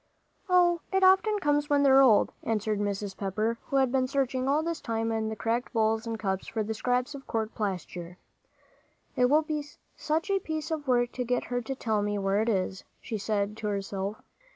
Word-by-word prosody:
"Oh, 350 Hz, -2 st, +4 dB
it 385 Hz, 0 st, +2 dB
often 380 Hz, +3 st, +5 dB
comes 295 Hz, -5 st, +1 dB
on -, -, -19 dB
when 285 Hz, -1 st, +3 dB
they're 270 Hz, -1 st, +7 dB
old," 235 Hz, -6 st, +5 dB
answered 215 Hz, -1 st, -1 dB
Mrs. 205 Hz, -1 st, -2 dB
Pepper, 215 Hz, +4 st, -2 dB
who -, -, -3 dB
had 265 Hz, -2 st, +3 dB
been 260 Hz, -1 st, +1 dB
searching 260 Hz, -1 st, -1 dB
all 295 Hz, +3 st, +2 dB
this 335 Hz, 0 st, -3 dB
time 225 Hz, -1 st, -1 dB
in 220 Hz, -1 st, -1 dB
all -, -, -2 dB
the 220 Hz, -, -4 dB
cracked 225 Hz, +4 st, -1 dB
bowls 220 Hz, 0 st, +1 dB
and 225 Hz, -1 st, -3 dB
cups 190 Hz, -3 st, -2 dB
for 220 Hz, -1 st, -2 dB
the 220 Hz, +1 st, -3 dB
scraps 250 Hz, +4 st, -1 dB
of 275 Hz, -1 st, -10 dB
court 220 Hz, -1 st, -2 dB
plaster. 180 Hz, -3 st, -4 dB, 1.0 s
"It 250 Hz, -, +4 dB
will 305 Hz, +3 st, +4 dB
be 305 Hz, -1 st, -3 dB, 0.3 s
such 320 Hz, +6 st, -1 dB
a 390 Hz, -, +2 dB
piece 315 Hz, -2 st, -4 dB
of 300 Hz, -3 st, -3 dB
work 245 Hz, -1 st, +2 dB
to 250 Hz, -, -3 dB
get 245 Hz, 0 st, 0 dB
her 245 Hz, 0 st, -2 dB
to 265 Hz, +3 st, -4 dB
tell 220 Hz, -5 st, 0 dB
me 205 Hz, 0 st, -1 dB
where 195 Hz, +1 st, +1 dB
it 225 Hz, -, 0 dB
is," 190 Hz, -2 st, -1 dB, 0.2 s
she 220 Hz, -3 st, -5 dB
said 205 Hz, 0 st, -1 dB
to 215 Hz, -, -4 dB
herself. 200 Hz, 0 st, -3 dB
230 Hz, 215 wpm, -28 LUFS, 210-280 Hz, 1.0 s, they're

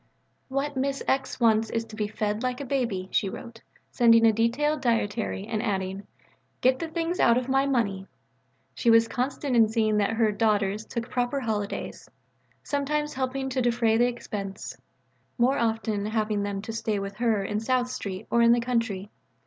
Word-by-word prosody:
"What 275 Hz, +2 st, -2 dB
Miss 275 Hz, +1 st, -1 dB
X. 265 Hz, -1 st, 0 dB
wants 225 Hz, -2 st, +3 dB
is 230 Hz, 0 st, -2 dB
to 220 Hz, -, -11 dB
be 210 Hz, -1 st, -1 dB
fed 210 Hz, 0 st, -2 dB
like 255 Hz, -1 st, -2 dB
a 280 Hz, -, -5 dB
baby," 235 Hz, -9 st, -1 dB
she 195 Hz, -, +1 dB
wrote, 230 Hz, +3 st, -9 dB, 0.3 s
sending 230 Hz, -1 st, +5 dB
a 225 Hz, -, +5 dB
detailed 265 Hz, +7 st, +1 dB
dietary 205 Hz, -, -1 dB
and 215 Hz, -, -2 dB
adding, 195 Hz, -2 st, -3 dB, 0.5 s
"Get 260 Hz, +1 st, +3 dB
the 330 Hz, -, -3 dB
things 335 Hz, +2 st, -2 dB
out 235 Hz, 0 st, +5 dB
of 250 Hz, 0 st, -1 dB
my 270 Hz, +1 st, +2 dB
money." 200 Hz, -8 st, 0 dB, 0.7 s
She 235 Hz, -, +1 dB
was 230 Hz, 0 st, +6 dB
constant 260 Hz, +2 st, -2 dB
in 225 Hz, -2 st, +5 dB
seeing 220 Hz, -1 st, +1 dB
that 205 Hz, +1 st, +1 dB
her 225 Hz, -1 st, +2 dB
"daughters" 210 Hz, -1 st, 0 dB
took 235 Hz, 0 st, -4 dB
proper 245 Hz, +2 st, 0 dB
holidays; 210 Hz, -4 st, -4 dB, 0.5 s
sometimes 295 Hz, +1 st, -1 dB
helping 265 Hz, +1 st, -2 dB
to 260 Hz, 0 st, -1 dB
defray 235 Hz, -2 st, +2 dB
the 240 Hz, +2 st, +4 dB
expense, 205 Hz, -5 st, -5 dB, 0.6 s
more 255 Hz, +3 st, +3 dB
often 220 Hz, -2 st, -1 dB
having 215 Hz, -1 st, 0 dB
them 200 Hz, -1 st, -3 dB
to 225 Hz, -, -5 dB
stay 220 Hz, -1 st, -1 dB
with 195 Hz, 0 st, -5 dB
her 225 Hz, -4 st, +1 dB
in 210 Hz, +2 st, -2 dB
South 250 Hz, +2 st, +1 dB
Street 195 Hz, -6 st, -5 dB
or 235 Hz, -, +4 dB
in 235 Hz, 0 st, +6 dB
the 240 Hz, -, +3 dB
country. 230 Hz, -5 st, -2 dB
230 Hz, 180 wpm, -26 LUFS, 210-255 Hz, 0.7 s, was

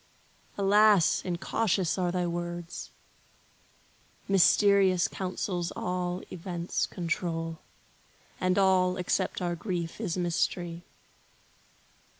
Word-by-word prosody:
Alas, 205 Hz, -2 st, +4 dB
incautious 185 Hz, 0 st, 0 dB
are 180 Hz, -2 st, 0 dB
thy 180 Hz, 0 st, -1 dB
words! 175 Hz, 0 st, -5 dB, 1.4 s
Mysterious 195 Hz, -1 st, +4 dB
counsels 180 Hz, -2 st, -3 dB
all 180 Hz, 0 st, -3 dB
events 175 Hz, 0 st, -3 dB
control, 165 Hz, -2 st, -3 dB, 0.8 s
And 185 Hz, +1 st, +1 dB
all, 185 Hz, -2 st, +3 dB
except 180 Hz, 0 st, -1 dB
our 175 Hz, -1 st, -1 dB
grief, 175 Hz, 0 st, -4 dB
is 185 Hz, -5 st, -2 dB
mystery. 175 Hz, 0 st, -1 dB
180 Hz, 85 wpm, -28 LUFS, 175-190 Hz, 1.4 s, Alas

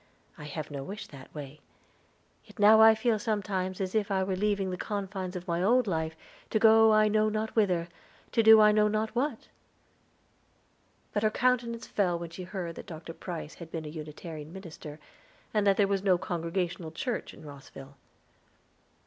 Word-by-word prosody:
I 150 Hz, -, -10 dB
have 150 Hz, 0 st, -6 dB
no 140 Hz, -1 st, -5 dB
wish 200 Hz, +5 st, -7 dB
that 135 Hz, -8 st, -13 dB
way. 145 Hz, 0 st, -8 dB, 0.8 s
Yet -, -, -18 dB
now 215 Hz, +1 st, +7 dB
I 220 Hz, 0 st, +8 dB
feel 220 Hz, -1 st, +1 dB
sometimes 195 Hz, -4 st, -2 dB
as 190 Hz, -1 st, -3 dB
if 215 Hz, -2 st, 0 dB
I 190 Hz, -1 st, +1 dB
were 190 Hz, 0 st, -1 dB
leaving 200 Hz, -1 st, 0 dB
the -, -, -2 dB
confines 195 Hz, -2 st, -4 dB
of 180 Hz, +1 st, -6 dB
my 170 Hz, 0 st, -1 dB
old 240 Hz, +6 st, +3 dB
life 160 Hz, -4 st, -2 dB, 0.3 s
to -, -, +1 dB
go 220 Hz, 0 st, +6 dB
I 215 Hz, 0 st, +5 dB
know 215 Hz, 0 st, +2 dB
not 215 Hz, +1 st, -3 dB
whither, 180 Hz, -6 st, +2 dB, 0.4 s
to 230 Hz, -, +3 dB
do 220 Hz, 0 st, +8 dB
I 210 Hz, 0 st, +7 dB
know 210 Hz, 0 st, +3 dB
not 215 Hz, +1 st, -1 dB
what." 270 Hz, +5 st, -2 dB, 1.6 s
But 205 Hz, -, 0 dB
her 215 Hz, -, +3 dB
countenance 235 Hz, 0 st, 0 dB
fell 180 Hz, -4 st, 0 dB
when 170 Hz, -1 st, -7 dB
she 180 Hz, +2 st, -8 dB
heard 180 Hz, -3 st, -5 dB
that -, -, -9 dB
Dr. 165 Hz, 0 st, -8 dB
Price 170 Hz, -3 st, -7 dB
had 170 Hz, -2 st, -11 dB
been 165 Hz, -1 st, -5 dB
a -, -, -6 dB
Unitarian 155 Hz, 0 st, -8 dB
minister, 160 Hz, -5 st, -10 dB, 0.5 s
and 210 Hz, -2 st, +2 dB
that 195 Hz, -, +4 dB
there 205 Hz, -, +4 dB
was 195 Hz, -1 st, 0 dB
no 190 Hz, -2 st, +3 dB
Congregational 175 Hz, 0 st, -3 dB
church 235 Hz, +10 st, -4 dB
in -, -, -14 dB
Rosville. 140 Hz, -1 st, -12 dB
190 Hz, 185 wpm, -29 LUFS, 170-215 Hz, 1.6 s, I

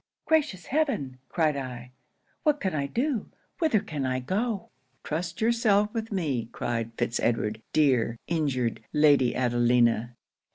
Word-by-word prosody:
'"Gracious 300 Hz, -, +1 dB
heaven!" 255 Hz, -, -1 dB
cried 155 Hz, -4 st, +1 dB
I, 125 Hz, -2 st, -6 dB, 0.5 s
"what 300 Hz, -2 st, +2 dB
can 190 Hz, -, -1 dB
I 140 Hz, -2 st, -1 dB
do? 245 Hz, -, -1 dB, 0.3 s
Whither 315 Hz, -, +3 dB
can 150 Hz, -4 st, -4 dB
I 130 Hz, 0 st, 0 dB
go!" 200 Hz, -, -2 dB, 0.3 s
'"Trust 170 Hz, +4 st, -3 dB
yourself 215 Hz, -3 st, +3 dB
with 225 Hz, -1 st, -3 dB
me," 140 Hz, -, -1 dB
cried 115 Hz, -1 st, -2 dB
Fitz 115 Hz, -, 0 dB
Edward 110 Hz, -2 st, 0 dB
"dear, 130 Hz, -6 st, +2 dB
injured 130 Hz, -9 st, -1 dB
Lady 145 Hz, -5 st, +4 dB
Adelina." 120 Hz, -1 st, +2 dB
150 Hz, 130 wpm, -27 LUFS, -, 0.5 s, Lady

